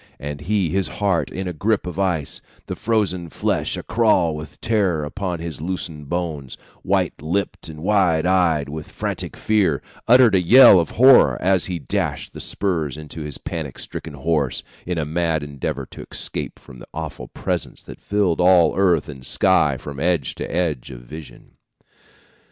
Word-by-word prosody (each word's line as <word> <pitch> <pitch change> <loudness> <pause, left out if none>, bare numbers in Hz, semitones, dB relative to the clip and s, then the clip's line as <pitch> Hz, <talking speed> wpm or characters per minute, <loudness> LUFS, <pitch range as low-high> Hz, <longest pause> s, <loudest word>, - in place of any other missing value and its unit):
And 70 0 -6
he, 95 0 0
his 95 +1 +1
heart 100 -5 0
in 95 +1 -5
a 90 - -3
grip 105 +6 0
of 90 +1 -5
ice, 85 -7 -1 0.2
the - - -5
frozen 100 -6 -1
flesh - - -1
a - - -6
crawl 105 -8 +2
with 75 0 -9
terror 100 -9 +1
upon 90 +3 -3
his 80 -3 -6
loosened 80 -4 -5
bones, 80 -7 -3 0.2
white - - 0
lipped 85 +3 -2
and 75 0 -9
wide 90 -6 +2
eyed 85 -6 +2
with 75 +1 -7
frantic - - -4
fear, 100 -10 +2 0.3
uttered 120 -2 +6
a 95 - +4
yell 100 +1 +8
of 85 - -1
horror 130 +2 +7
as 95 -1 +2
he 90 -2 -3
dashed 70 -7 -3
the - - -7
spurs 80 -8 -2
into 75 +1 -8
his 75 -2 -5
panic 80 -5 -6
stricken 80 -3 -7
horse, 70 -2 -1 0.2
in 90 -1 -2
a 80 - -1
mad 80 0 -1
endeavor 70 -2 -4
to - - -10
escape - - -4
from 65 - -14
the - - -12
Awful 80 -1 -6
Presence - - -4
that - - -12
filled 100 -5 +1
all 90 -3 +5
earth 90 -6 +2
and 70 -4 -9
sky - - +3
from 70 -2 -8
edge 85 -4 0
to - - -6
edge 80 -7 -1
of 60 -2 -9
vision. 75 +5 -12
85 Hz, 175 wpm, -21 LUFS, 75-95 Hz, 0.3 s, yell